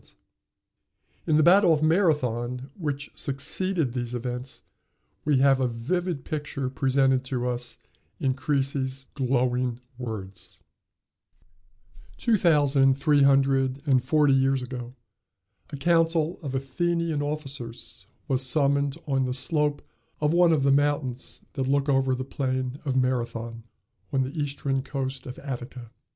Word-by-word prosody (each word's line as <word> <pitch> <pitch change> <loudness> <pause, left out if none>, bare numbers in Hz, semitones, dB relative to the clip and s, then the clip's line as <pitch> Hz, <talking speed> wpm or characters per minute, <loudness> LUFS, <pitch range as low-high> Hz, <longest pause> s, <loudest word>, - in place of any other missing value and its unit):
] - - -42
In 155 -2 +4
the 155 - +5
battle 180 +2 +6
of 155 -1 +2
Marathon, 130 - +1
which 145 -4 -4
succeeded 145 +1 -1
these 120 -1 -3
events, 125 +1 -5 0.6
we 145 -2 +3
have 135 0 +4
a 130 - +2
vivid 145 +6 -2
picture 145 -3 -3
presented 135 -1 +2
to 125 -1 -2
us 120 -1 -3 0.4
in 130 -1 +1
Creasy's 135 -1 -1
glowing 125 -2 0 0.2
words: 105 -6 -7 1.6
Two 230 - +2
thousand 145 -7 +4
three 145 +1 +3
hundred 135 0 +3
and 130 -2 +3
forty 145 +1 +3
years 135 -1 +2
ago 125 0 -7 0.7
a 145 - -6
council 165 +2 +2
of 135 -4 -4
Athenian 165 +3 -1
officers 135 -8 -5 0.2
was 135 -3 +1
summoned 140 +1 +2
on 135 -2 +1
the 125 0 -1
slope 150 +2 0 0.4
of 150 +1 +1
one 175 -1 +5
of 150 -4 +2
the 140 - +4
mountains 140 -3 0
that 130 -1 -2
look 140 0 +2
over 135 -2 +2
the 130 - -4
plain 130 0 -3
of 135 -2 0
Marathon, 120 -3 -2 0.5
on 135 -1 +2
the 130 +5 -6
eastern 140 -2 -1
coast 135 -1 -4
of 125 - -7
Attica. 125 -3 -7
135 Hz, 135 wpm, -26 LUFS, 130-145 Hz, 1.6 s, battle